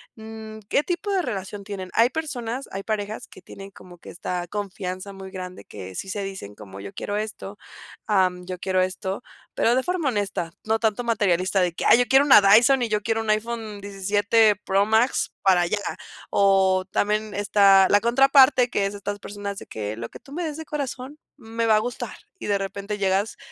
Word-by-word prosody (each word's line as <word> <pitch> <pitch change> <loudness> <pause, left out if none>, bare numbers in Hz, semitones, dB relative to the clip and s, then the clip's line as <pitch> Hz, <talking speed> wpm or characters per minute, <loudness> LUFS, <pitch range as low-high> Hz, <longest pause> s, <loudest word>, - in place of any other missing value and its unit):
mm, 220 0 -9
¿qué - - +3
tipo 355 +4 -3
de 385 - +2
relación 205 - -5
tienen? 195 -2 -7
Hay 235 +2 +4
personas, 260 -4 -4
hay 195 - -4
parejas 215 +2 -4
que 185 - -16
tienen 195 0 -11
como 180 -3 -15
que - - -12
esta 175 0 -4
confianza 195 -1 -5
muy 190 0 -9
grande, 185 -1 -8
que 95 -2 -9
sí 190 - -5
se 205 0 -3
dicen 190 - -7
como: 100 -2 -11
"Yo 100 0 -8
quiero 205 - -4
esto, 210 -1 -6 0.5
am, 185 -4 +2
yo 185 - -5
quiero 185 0 0
esto", 190 +2 -3 0.3
pero 235 - +2
de 260 - +1
forma 350 -5 -1
honesta, 200 -6 -2
no 220 +1 0
tanto 220 +1 0
materialista 195 -4 +1
de 175 -2 +1
que: - - -4
"Ay, 240 - +7
yo 245 - +3
quiero 270 +2 +6
una 265 -7 +8
Dyson 240 +7 +6
y 235 - 0
yo 210 -1 0
quiero 225 0 0
un 220 - -5
iPhone 215 -1 -2
17 205 +2 +2
Pro 195 +1 +2
Max 225 +4 +2
para 180 -3 +4
ya", 210 - 0 0.5
o 190 -1 +3
también 210 0 0
está 200 -2 +5
la 205 +1 +4
contraparte, 260 +1 +5
que 200 -3 +1
es 200 - -6
estas 205 0 -5
personas 200 0 -6
de - - -12
que: 105 0 -5
"Lo 115 +1 -6
que - - -12
tú 275 - -18
me 345 +3 -3
des 310 -2 -4
de 320 - -7
corazón, 280 -1 -5 0.2
me 230 -2 -3
va 220 - +5
a 215 - +4
gustar", 245 +3 -5 0.2
y - - -7
de 205 - +2
repente 200 +2 -4
llegas 195 +3 0
205 Hz, 205 wpm, -24 LUFS, 190-230 Hz, 0.5 s, una